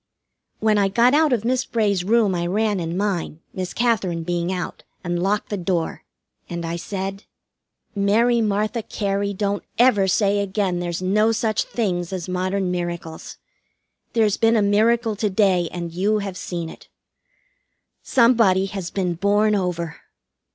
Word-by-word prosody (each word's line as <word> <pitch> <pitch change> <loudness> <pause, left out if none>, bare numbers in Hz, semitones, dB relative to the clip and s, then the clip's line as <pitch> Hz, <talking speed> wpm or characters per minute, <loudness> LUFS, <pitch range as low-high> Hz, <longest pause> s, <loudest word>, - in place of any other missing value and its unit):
When 215 -1 +3
I 200 - +3
got 235 +6 +3
out 305 0 +4
of 230 -3 0
Miss 255 +1 +1
Bray's 205 -5 0
room 215 0 +3
I 175 -1 -1
ran 210 +1 0
in 170 +1 -3
mine, 185 -6 -2
Miss 185 -1 -4
Katherine 200 -8 0
being 175 +1 -1
out, 180 -1 -5 0.2
and 175 -1 -2
locked 205 +3 0
the 205 - -2
door, 175 -2 -2 0.4
and 170 -1 -4
I 165 +1 -3
said: 195 +3 -5 0.7
"Mary 225 +4 +3
Martha 215 +2 0
Cary, 200 -1 -2
don't 200 0 -2
ever 220 -6 +4
say 200 +1 +2
again 195 -2 -1
there's 175 0 -3
no 210 +4 +3
such 220 -1 0
things 180 -6 -2
as 185 -2 -4
modern 185 +1 -1
miracles. 175 -2 -5 0.8
There's 215 -3 +2
been 225 0 +3
a 210 - +3
miracle 220 +2 +2
to 210 0 0
day, 185 -4 +2
and 170 -2 -5
you 200 +5 +1
have 200 -3 -4
seen 170 -1 -4
it. - - -12 1.1
Somebody 230 -6 +4
has 195 -3 -5
been 185 -3 -1
born 205 +4 +2
over." 180 -4 -2
200 Hz, 155 wpm, -22 LUFS, 180-215 Hz, 1.1 s, out